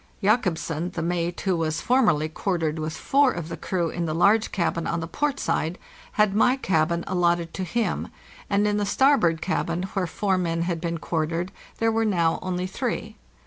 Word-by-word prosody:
Jacobsen, 180 Hz, -6 st, +1 dB
the 175 Hz, -3 st, -4 dB
mate, 175 Hz, 0 st, -1 dB
who 190 Hz, -2 st, +1 dB
was 160 Hz, -1 st, -1 dB
formerly 225 Hz, -, +3 dB
quartered 160 Hz, -1 st, -2 dB
with 155 Hz, 0 st, -3 dB
four 280 Hz, -1 st, +3 dB
of 170 Hz, -5 st, -5 dB
the -, -, -4 dB
crew 175 Hz, -3 st, -2 dB
in 170 Hz, -1 st, -2 dB
the 155 Hz, -, -2 dB
large 205 Hz, +6 st, +4 dB
cabin 170 Hz, -3 st, -1 dB
on 170 Hz, -, -1 dB
the 165 Hz, -, -3 dB
port 280 Hz, -, -1 dB
side, 165 Hz, +4 st, -1 dB, 0.4 s
had 210 Hz, -2 st, +3 dB
my 245 Hz, +5 st, +4 dB
cabin 170 Hz, -7 st, +1 dB
al 190 Hz, -, -2 dB
lotted 170 Hz, -1 st, +1 dB
to 190 Hz, -, -3 dB
him; 230 Hz, +6 st, -1 dB, 0.4 s
and 205 Hz, +1 st, +2 dB
in 205 Hz, 0 st, +1 dB
the 205 Hz, -, 0 dB
starboard 195 Hz, -, +3 dB
cabin, 175 Hz, -1 st, -1 dB
where 190 Hz, -3 st, 0 dB
four 190 Hz, +2 st, 0 dB
men 165 Hz, -1 st, 0 dB
had 170 Hz, -2 st, -2 dB
been 170 Hz, -1 st, -2 dB
quartered, 165 Hz, +3 st, -2 dB, 0.3 s
there 225 Hz, 0 st, +2 dB
were 225 Hz, 0 st, +1 dB
now 170 Hz, -6 st, +2 dB
only 180 Hz, -1 st, -2 dB
three. 185 Hz, -, -3 dB
175 Hz, 190 wpm, -25 LUFS, 165-205 Hz, 0.4 s, large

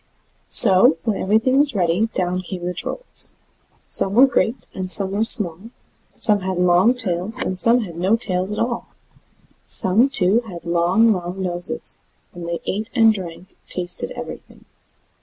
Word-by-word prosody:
So, 190 Hz, -6 st, +7 dB
when 215 Hz, -3 st, -4 dB
everything 225 Hz, +7 st, 0 dB
was 290 Hz, -4 st, +2 dB
ready, 180 Hz, +3 st, -1 dB
down 185 Hz, -3 st, -3 dB
came 180 Hz, -1 st, -9 dB
the 180 Hz, -, -4 dB
Trolls. -, -, +1 dB, 0.5 s
Some 195 Hz, +1 st, +1 dB
were 255 Hz, +3 st, +6 dB
great, 250 Hz, -2 st, -3 dB
and 185 Hz, -1 st, -6 dB
some 195 Hz, 0 st, +3 dB
were 205 Hz, +2 st, -2 dB
small; 205 Hz, -2 st, +3 dB, 0.5 s
some 210 Hz, -2 st, +4 dB
had 190 Hz, -1 st, -5 dB
long 180 Hz, +7 st, +1 dB
tails, 205 Hz, 0 st, -3 dB
and 225 Hz, -8 st, -3 dB
some 235 Hz, +6 st, +2 dB
had 175 Hz, -7 st, -9 dB
no 185 Hz, +6 st, 0 dB
tails 185 Hz, -4 st, -3 dB
at 210 Hz, -, -6 dB
all; 235 Hz, 0 st, -4 dB, 0.8 s
some, 220 Hz, +9 st, +2 dB
too, 205 Hz, -4 st, +2 dB
had 175 Hz, -4 st, -11 dB
long, 175 Hz, +7 st, +1 dB
long 180 Hz, 0 st, -7 dB
noses; 175 Hz, -1 st, -3 dB, 0.3 s
and 175 Hz, -1 st, -10 dB
they 170 Hz, -, -6 dB
ate 215 Hz, +4 st, -5 dB
and 225 Hz, -2 st, +3 dB
drank, 185 Hz, -1 st, -10 dB
and -, -, -32 dB
tasted 180 Hz, -, -1 dB
everything. -, -, -12 dB
190 Hz, 160 wpm, -18 LUFS, 180-225 Hz, 0.8 s, So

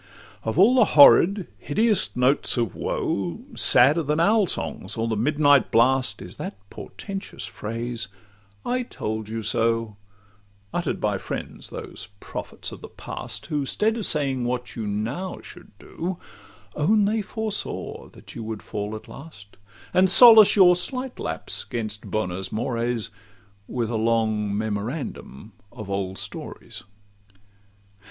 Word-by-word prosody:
Of 110 Hz, -, -3 dB
all 205 Hz, +7 st, +6 dB
the 250 Hz, -4 st, +5 dB
horrid, 180 Hz, +6 st, +7 dB
hideous 215 Hz, +7 st, +2 dB
notes 130 Hz, +2 st, +2 dB
of 115 Hz, -6 st, 0 dB
woe, 90 Hz, -4 st, -2 dB
Sadder 145 Hz, +7 st, +5 dB
than 150 Hz, +1 st, -1 dB
owl 205 Hz, +3 st, +4 dB
songs -, -, -3 dB
or 115 Hz, +1 st, -1 dB
the 110 Hz, -, -1 dB
midnight 145 Hz, +3 st, +3 dB
blast, 125 Hz, -2 st, +2 dB
Is 90 Hz, -, -11 dB
that -, -, -6 dB
portentous 195 Hz, -2 st, -7 dB
phrase, 115 Hz, 0 st, -4 dB, 0.6 s
'I 250 Hz, +1 st, 0 dB
told 110 Hz, 0 st, -4 dB
you 115 Hz, 0 st, -4 dB
so,' 115 Hz, 0 st, 0 dB, 0.8 s
Utter'd 175 Hz, -3 st, -2 dB
by 105 Hz, -2 st, 0 dB
friends, -, -, -6 dB
those -, -, -8 dB
prophets -, -, -7 dB
of -, -, -10 dB
the -, -, -8 dB
past, -, -, -7 dB
Who, 150 Hz, -2 st, -2 dB
'stead 215 Hz, +11 st, 0 dB
of 225 Hz, -4 st, -2 dB
saying 135 Hz, -4 st, -1 dB
what 125 Hz, 0 st, -3 dB
you 110 Hz, -3 st, -4 dB
now 115 Hz, -, -3 dB
should -, -, -13 dB
do, 175 Hz, +2 st, -5 dB, 0.6 s
Own 205 Hz, +7 st, +3 dB
they 215 Hz, +2 st, +1 dB
foresaw 215 Hz, +1 st, -5 dB
that -, -, -14 dB
you 115 Hz, -, -6 dB
would 110 Hz, -1 st, -6 dB
fall 105 Hz, +1 st, -4 dB
at 110 Hz, -, -10 dB
last, 135 Hz, -9 st, -13 dB, 0.4 s
And 185 Hz, +1 st, +4 dB
solace 220 Hz, 0 st, +9 dB
your 180 Hz, -3 st, +7 dB
slight 255 Hz, +8 st, -4 dB
lapse 80 Hz, 0 st, -4 dB
'gainst 110 Hz, -1 st, -5 dB
'bonos 95 Hz, -3 st, -3 dB
mores,' 115 Hz, -1 st, -2 dB, 0.6 s
With 120 Hz, -2 st, -2 dB
a 115 Hz, -, -1 dB
long 110 Hz, -2 st, 0 dB
memorandum 110 Hz, -, -5 dB, 0.2 s
of 100 Hz, -2 st, -8 dB
old 95 Hz, -1 st, -3 dB
stories. -, -, -7 dB
120 Hz, 140 wpm, -24 LUFS, 110-175 Hz, 0.8 s, solace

